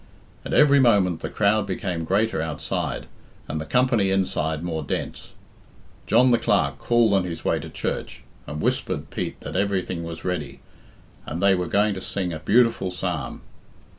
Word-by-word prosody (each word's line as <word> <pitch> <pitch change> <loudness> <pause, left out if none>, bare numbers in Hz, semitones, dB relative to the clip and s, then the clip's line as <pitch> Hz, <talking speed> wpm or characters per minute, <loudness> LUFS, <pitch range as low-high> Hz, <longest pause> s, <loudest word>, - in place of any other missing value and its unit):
At - - -6
every 140 -1 +6
moment 100 -9 +3
the - - -4
crowd 105 0 +2
became 90 -3 -3
greater 105 0 +1
outside, 75 -3 -3 0.4
and 80 +1 -3
the - - -5
company 125 -5 +2
inside 80 -5 0
more 80 -2 -2
dense. 70 - -5 0.7
John 125 +4 +5
the 120 - +4
Clerk 70 -11 +1
called 120 -3 +3
on 95 -2 +3
his 85 -2 -6
way - - +2
to - - -8
church, - - -4 0.2
and 75 +1 -5
whispered - - -1
Pete - - -4
that - - -7
everything 95 -3 -1
was 85 0 -7
ready, 90 -1 -3 0.7
and 80 - -4
they 100 +1 +4
were 90 -2 -1
going 105 +3 +2
to 95 - -6
sing 90 -2 -3
a 80 - -5
beautiful 115 +2 +3
psalm. 90 -3 -4
95 Hz, 165 wpm, -24 LUFS, 85-105 Hz, 0.7 s, every